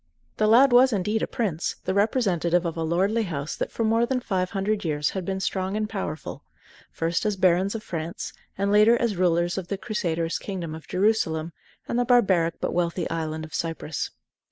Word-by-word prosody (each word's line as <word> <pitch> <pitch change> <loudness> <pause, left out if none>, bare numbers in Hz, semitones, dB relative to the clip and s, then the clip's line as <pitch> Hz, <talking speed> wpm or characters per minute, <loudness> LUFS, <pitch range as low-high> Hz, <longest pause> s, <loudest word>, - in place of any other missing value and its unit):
The 215 - +3
lad 250 +5 +6
was 255 +2 +7
indeed 210 +1 0
a - - 0
prince, 185 -9 -2
the 185 - 0
representative 190 -5 +1
of 165 - -2
a 165 - -3
lordly 190 +8 +1
house 155 -7 -3
that - - -3
for 230 - -2
more 225 +1 +3
than 260 0 0
five 185 -6 -1
hundred 205 +1 -1
years 150 -3 0
had 190 -2 -4
been 190 +1 -2
strong 190 +1 -1
and 215 0 -1
powerful, 190 -7 -5 0.5
first 165 +1 -1
as 210 -1 0
barons 185 +3 +2
of 220 - -5
France, 165 -2 -5 0.2
and 200 +1 0
later 215 +3 +5
as 235 -4 0
rulers 175 0 +1
of 180 - -8
the 200 - -3
Crusaders' 170 -6 -2
kingdom 180 -5 -5
of 160 -2 -10
Jerusalem 170 -6 +1 0.3
and 235 - 0
the - - +3
barbaric 190 -9 +3
but - - -2
wealthy 170 -1 0
island 160 -1 -3
of 155 - -14
Cyprus. 165 -2 -3
190 Hz, 195 wpm, -25 LUFS, 165-215 Hz, 0.5 s, was